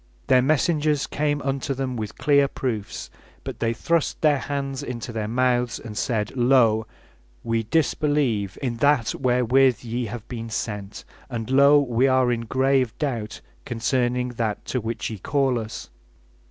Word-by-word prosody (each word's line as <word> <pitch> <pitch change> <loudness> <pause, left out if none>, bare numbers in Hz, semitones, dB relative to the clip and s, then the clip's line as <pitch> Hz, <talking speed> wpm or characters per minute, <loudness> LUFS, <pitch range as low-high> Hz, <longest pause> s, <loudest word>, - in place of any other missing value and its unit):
Their 130 -1 +5
messengers 150 +1 +1
came 145 -1 -1
unto 135 0 -2
them 130 -1 -3
with 110 -3 -5
clear 140 -1 +4
proofs, 115 -7 -4 0.3
but - - -7
they 115 -1 +1
thrust 165 +7 0
their 150 -3 +4
hands 140 -1 -3
into 120 -4 -6
their 110 -2 -2
mouths, 125 0 +1
and 110 -2 -9
said: 105 +1 -1
Lo! 120 -4 +3 0.6
we 115 0 0
disbelieve 125 - 0
in 120 -3 -2
that 140 -3 +2
wherewith 125 0 +2
ye 120 +1 -3
have 115 +1 -7
been 115 -2 -6
sent, 105 -2 -5 0.2
and 115 -1 -4
lo! 140 +2 +6
we 130 -1 +2
are 130 -2 +3
in 115 -1 -2
grave 130 -1 +1
doubt 120 -8 -3 0.2
concerning 125 +1 0
that 115 -3 -3
to 125 - -2
which 115 +1 -4
ye 110 - -6
call 135 +2 +1
us. 110 - -7
125 Hz, 155 wpm, -24 LUFS, 115-135 Hz, 0.6 s, lo